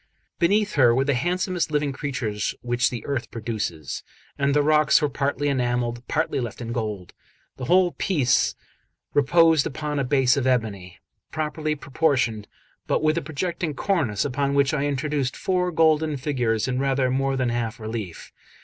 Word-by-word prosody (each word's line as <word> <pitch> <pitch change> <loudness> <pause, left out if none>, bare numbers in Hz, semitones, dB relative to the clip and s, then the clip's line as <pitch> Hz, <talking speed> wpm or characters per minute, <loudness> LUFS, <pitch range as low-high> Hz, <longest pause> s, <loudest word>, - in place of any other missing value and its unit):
Beneath 205 +4 +2
her 120 -4 +5
were 135 +2 +2
the 140 - +2
handsomest 175 +5 -1
living 150 -2 0
creatures 120 -7 -3
which 120 0 +1
the 120 -3 -6
earth 140 -4 -3
produces; 105 - -4 0.3
and 140 0 +1
the 145 - +4
rocks 150 0 +4
were 150 - 0
partly 140 +1 -1
enamelled, 120 -3 0
partly 160 -2 0
left 120 -4 -5
in 115 -1 -5
gold. 105 -6 -4 0.4
The 130 - -5
whole 180 +4 +4
piece 145 -12 +1 0.6
reposed 160 +2 +4
upon 150 0 -3
a - - +1
base 130 -1 +3
of 130 -2 0
ebony, 105 -8 -1 0.3
properly 155 0 -2
proportioned, 130 -7 0 0.4
but - - 0
with 155 0 +3
a 170 - 0
projecting 160 +1 -3
cornice, 135 - 0
upon 140 +1 -1
which 140 -1 +3
I 145 -1 0
introduced 140 -1 -1
four 180 -1 0
golden 160 -2 +2
figures 125 -5 0
in 130 0 -1
rather 135 -1 +1
more 135 +1 0
than 130 -2 0
half 120 0 -2
relief. 110 -5 -6
140 Hz, 160 wpm, -24 LUFS, 120-155 Hz, 0.6 s, her